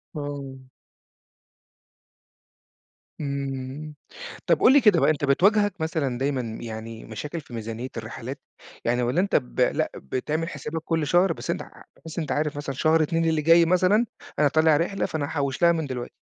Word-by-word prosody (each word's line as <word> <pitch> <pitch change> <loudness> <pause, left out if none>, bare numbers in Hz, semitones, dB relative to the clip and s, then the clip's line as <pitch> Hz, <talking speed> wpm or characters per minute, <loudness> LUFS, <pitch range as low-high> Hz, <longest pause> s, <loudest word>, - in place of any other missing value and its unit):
آه. 140 -3 -6 2.5
إمم، 140 +1 -4 0.5
طب - - +4
قُل - - +6
لي 285 - +6
كده 205 -6 +5
بقى - - +4
أنت 145 -2 -1
بتواجهك 200 +5 +3
مثلًا 145 -6 -1
دايمًا 135 0 0 0.2
يعني 110 0 -7
مشاكل 145 +9 -6
في 125 - -15
ميزانيّة 115 +2 -5
الرحلات، 120 +4 -6 0.4
يعني 120 +1 +1
والّا 125 +8 +1
أنت 195 - 0
ب 60 -1 -1
لأ - - +1
بتعمل 155 - -3
حسابك 150 +2 -5
كلّ 165 -3 -1
شهر 175 +2 +4
بس - - -9
أنت - - -1
ع - - -9 0.3
بحيث 160 0 -10
إن - - 0
أنت - - -5
عارف 150 0 -1
مثلًا 140 -2 -4
شهر 160 +3 +3
2 165 +2 0
اللي 160 -1 +2
جاي 165 +2 +6
مثلًا، 185 +6 +3 0.3
أنا 150 - +5
طالع 155 +1 +4
رحلة 180 +4 -1
فأنا 155 -3 -2
هاحوّش 140 -2 -2
لها 170 0 +6
من 160 -2 -1
دلوقتي. 125 -2 -5
150 Hz, 170 wpm, -25 LUFS, 130-165 Hz, 2.5 s, قُل